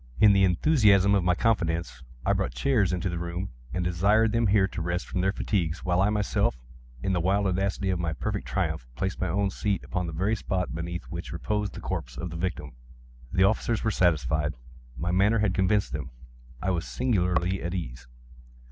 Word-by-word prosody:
In 105 -1 +7
the 100 0 +4
enthusiasm 100 - +4
of 100 -2 +3
my 90 0 +3
confidence, 85 -7 0 0.2
I - - +3
brought - - -1
chairs 105 - +2
into 90 +1 -1
the 85 -2 -2
room, 85 -1 -4 0.2
and 90 - -1
desired 100 +6 +3
them 115 0 +2
here 100 -1 +4
to 90 - -6
rest 85 +1 -2
from 90 - -2
their 95 +1 +2
fatigues, 90 -5 -2
while 90 0 +2
I 100 - +3
myself, 105 - 0 0.5
in 95 - 0
the 90 - +1
wild 100 +3 +2
audacity 95 +1 0
of 90 - -1
my 85 -1 -1
perfect 70 - -3
triumph, - - -2
placed 95 +9 -3
my 95 - +1
own 100 +3 0
seat 100 -2 -1
upon 90 -1 -3
the - - -4
very 95 +7 +1
spot 95 -5 -2
beneath 85 +2 -4
which 85 0 -6
reposed 105 +4 -2
the - - -7
corpse - - -4
of 90 +3 -4
the - - -6
victim. 85 -4 -3 0.6
The 95 - +3
officers 110 +3 +1
were 110 - +1
satisfied. 75 -4 +1 0.4
My 85 +5 -1
manner 100 +5 +3
had 105 -3 +1
convinced 100 +2 +1
them. 75 -3 -4 0.5
I 95 - +1
was 85 -2 -2
singularly 95 -6 0
at 85 +2 -3
ease. 65 -8 -6
95 Hz, 200 wpm, -27 LUFS, 85-100 Hz, 0.6 s, In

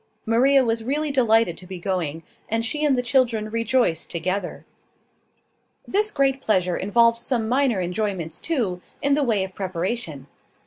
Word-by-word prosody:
Maria 260 +4 +4
was 225 -1 -1
really 290 +5 -1
delighted 225 -8 +3
to 180 - -10
be 190 0 -7
going, 170 -4 -3 0.3
and 225 +1 0
she 300 +6 -1
and 290 -3 +3
the 250 - -1
children 235 -5 +1
rejoiced 230 -6 +1
together. 185 +2 -3 1.2
This 420 +2 +1
great 275 -6 +1
pleasure 185 -7 +1
involved 230 +4 +3
some 235 -2 -1
minor 250 -3 +2
enjoyments 180 -2 -3
too, 220 - -2 0.2
in 280 0 +4
the 295 - +2
way 225 -8 +1
of 190 0 -7
preparation. 185 - -3
225 Hz, 150 wpm, -23 LUFS, 185-260 Hz, 1.2 s, Maria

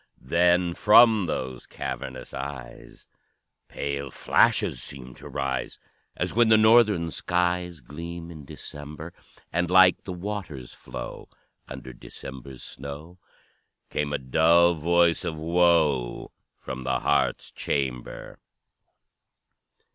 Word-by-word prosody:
Then, 85 +4 +2
from 110 -1 +6
those 65 -5 -4
cavernous 65 0 -6
eyes 65 -2 -8 0.6
Pale 70 -1 -4
flashes - - +2
seemed 65 -2 -7
to - - -11
rise, 65 -1 -3 0.4
As - - -2
when 115 0 +4
the 110 - +7
Northern 110 -6 +4
skies 90 -2 -1
Gleam 85 +5 -8
in 80 -3 -10
December; 75 +4 -9 0.4
And, 90 0 0
like 95 0 +6
the 95 - -6
water's 90 -9 -6
flow - - -9 0.4
Under 65 - -9
December's 65 +1 -10
snow, 75 +6 -9 0.7
Came 75 -1 -1
a 75 - 0
dull 80 +6 +4
voice 85 +1 +2
of 85 -3 -3
woe 80 -6 +1 0.3
From 65 -1 -7
the 65 0 -1
heart's 75 - 0
chamber. 65 -3 -4
80 Hz, 110 wpm, -26 LUFS, 70-90 Hz, 0.7 s, the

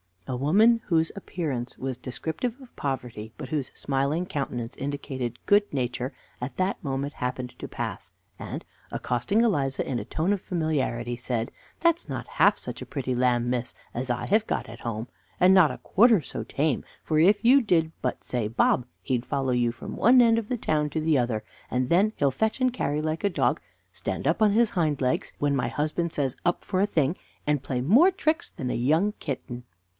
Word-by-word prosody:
A 130 - -2
woman 210 - +4
whose 165 -1 +2
appearance 150 -11 -4
was 130 -1 -3
descriptive 160 - -4
of 255 - -15
poverty 125 -5 -4
but - - -7
whose 145 -5 -1
smiling 140 +5 0
countenance 130 -8 -4
indicated 135 -4 -4
good 205 0 +4
nature, 125 0 -2 0.3
at 125 +2 -4
that 185 +1 0
moment 140 0 -2
happened 125 0 -3
to - - -5
pass, - - -5 0.3
and, - - -6 0.3
accosting 125 - 0
Eliza 145 - +1
in 125 - -1
a - - -6
tone 165 +5 0
of 200 - -2
familiarity, 140 -8 -1
said: 120 -1 -2 0.3
"That's 335 0 +2
not - - -4
half - - +6
such - - -6
a - - -5
pretty 130 -3 -3
lamb, 120 -1 +2
miss, 125 -1 -2 0.2
as 125 +2 -3
I 125 0 -1
have 215 +2 +3
got - - -2
at 115 0 -10
home, 115 0 -4 0.3
and 185 +1 +6
not 185 -5 +7
a 125 - -5
quarter 225 -2 +5
so - - -5
tame, 145 -2 0 0.2
for 155 -1 +1
if 200 +7 +5
you 260 +4 +7
did 165 -8 +2
but 125 - -2
say, 120 -4 -1
'Bob' 120 +2 +2 0.2
he'd 125 -2 -1
follow 135 -2 -1
you 120 -1 +2
from - - -8
one 245 +5 +6
end 230 -1 +5
of 220 - -6
the 250 - 0
town 150 -7 0
to 160 - -1
the 155 -2 +3
other, 120 -3 0 0.3
and 125 0 0
then 200 +5 +4
he'll 140 -2 +2
fetch 220 - -1
and 255 -1 +3
carry 150 - -1
like 155 +4 -2
a - - +4
dog, 180 - +1 0.3
stand - - -4
up - - +1
on 210 -2 +5
his 230 0 +3
hind 155 -6 0
legs, 125 -1 0
when 145 -1 +2
my 135 - 0
husband 155 +3 -1
says 135 -4 -1
'Up' 175 - +1
for 185 - -1
the 205 - +3
thing, 160 -3 +1 0.3
and 150 -2 +1
play 130 -2 -2
more 235 - +6
tricks 330 -4 0
than 130 -7 -4
a - - -1
young 160 - +2
kitten." 125 -4 -5
145 Hz, 200 wpm, -26 LUFS, 125-190 Hz, 0.3 s, not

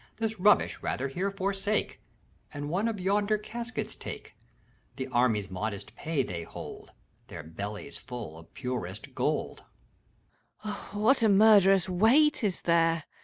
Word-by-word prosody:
This 225 -2 -2
rubbish, 205 +3 +4
rather, 135 +2 -2
here 185 +8 -1
forsake, 195 +1 -1 0.5
And 145 0 -5
one 200 +6 +1
of 220 -3 -2
yonder 205 +3 +2
caskets 235 +3 -5
take! - - -8 0.6
The 130 - -3
army's 115 -6 +1
modest 100 +2 -4
pay 155 -4 -1
they 90 -7 -5
hold, 80 - -9 0.4
Their 85 - -8
bellies 100 - -6
full 120 - -7
of 80 - -16
purest 120 -6 -5
gold. - - -1 1.0
SPEEDBOOTY. 210 -1 -6
what 240 +5 +5
a 220 - +5
murderous 195 -2 +6
weight 235 +11 +4
is 195 -4 -1
there 165 -1 +3
180 Hz, 135 wpm, -29 LUFS, -, 1.0 s, murderous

